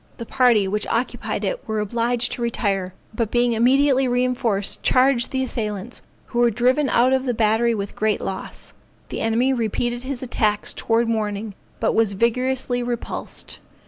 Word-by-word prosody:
The 235 - -6
party 235 -5 +3
which 210 +2 -2
occupied 235 +2 -2
it - - -4
were 220 -1 -1
obliged 235 +3 0
to - - -4
retire, 195 -6 -1 0.2
but 220 -1 -1
being 240 0 +2
immediately 265 +3 +3
reinforced 245 -5 0
charged 255 -1 +3
the 265 0 -1
assailants, 215 -2 -4 0.2
who 240 - -3
were 240 0 +5
driven 255 +5 +2
out 250 +2 +3
of 265 0 +1
the 245 -2 -1
battery 225 +2 +2
with 200 -1 -5
great 215 -1 0
loss. 190 - -6 0.4
The - - -4
enemy 235 +4 +2
repeated 240 +1 -1
his 260 0 -4
attacks 210 -4 0
towards 230 +1 +1
morning 215 -2 -2 0.3
but - - +1
was 220 -3 +2
vigorously 245 +3 0
repulsed. 240 -1 -5
235 Hz, 160 wpm, -22 LUFS, 215-250 Hz, 0.4 s, were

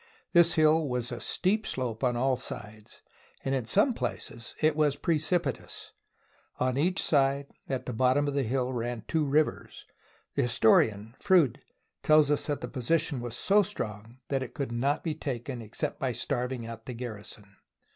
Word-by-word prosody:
This 170 -1 +6
hill 155 -1 +3
was 125 -1 -2
a 120 - -5
steep 210 +4 0
slope 125 -2 -3
on 120 -2 +2
all 130 +1 +2
sides, 110 -3 -9 0.4
and 135 - 0
in 130 -4 -1
some 205 - +4
places 120 - -5
it 155 -1 +3
was 150 -2 +2
precipitous. 160 -3 -1 0.7
On 130 0 0
each 175 +7 +1
side, 140 -1 +2 0.2
at 130 -1 -2
the 125 - -4
bottom 130 +5 +2
of 145 - -1
the 140 - +1
hill 130 +1 -1
ran 120 -2 -3
two 160 -2 +1
rivers. 150 +2 0 0.5
The - - +1
historian, 110 -2 +3
Froude, 180 - +3 0.4
tells 155 -1 +5
us 145 - +1
that 145 -2 -2
the - - -4
position 145 +1 0
was 120 0 -5
so 205 +1 +4
strong 115 - -5
that 135 -1 0
it 130 - -7
could 140 -5 -3
not 135 +6 0
be 160 - -1
taken 130 -4 -5
except 110 -2 -3
by - - -1
starving 125 -1 -2
out 115 -1 -9
the 125 - -5
gar 115 -3 -5
rison. 105 0 -10
130 Hz, 175 wpm, -29 LUFS, 120-155 Hz, 0.7 s, This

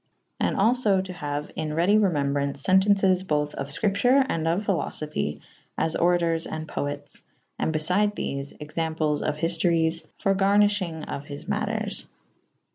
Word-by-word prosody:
And - - 0
all 220 +5 +4
fo 215 -6 +2
to 185 -1 -4
haue 145 -3 -4
in 155 -1 -3
redy 190 +6 +4
remewzbraunce 140 -7 0
fentences 190 -1 +4
bothe 150 -5 -1
of 140 - -4
fcripture 215 - +2
and 165 -7 -1
of 175 +6 0
philofophy 155 - -2 0.2
/ - - -38
as 160 - -2
oratours 170 -1 +2
and 160 0 -5
poetes 145 -1 -5 0.2
/ - - -45
and - - 0
befyde 180 +7 +1
thefe 140 -5 -4
/ - - -35
examples 155 0 -1
of - - -1
hiftoryes 165 0 +1
/ - - -44
for 195 - +3
garnylThynge 195 -4 +2
6f 140 - -6
his 145 -1 -8
maters. - - -2
165 Hz, 160 wpm, -25 LUFS, 150-195 Hz, 0.2 s, all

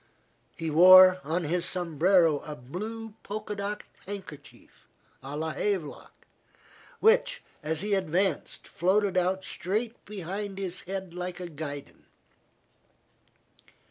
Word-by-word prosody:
He 165 -2 -3
wore 185 +3 +9
on 165 +4 -1
his 170 +3 0
sombrero 170 -2 +3
a 150 +1 -8
blue 215 - -7
polka 210 +1 -5
dot 205 +1 -4 0.2
handkerchief, 190 -8 -10 0.3
a 140 +2 -6
la 160 +1 -2
Havelock, 185 -4 -4 0.7
which, - - +3 0.2
as 155 +1 -2
he 205 0 -1
advanced, 190 0 -1
floated 195 +2 +1
out 185 +1 +1
straight 220 +7 -3
behind 195 0 -5
his 185 -2 -4
head, 190 -2 -5
like 180 0 -5
a 180 -1 -6
guidon. 145 -2 -8
185 Hz, 110 wpm, -28 LUFS, 160-200 Hz, 0.7 s, wore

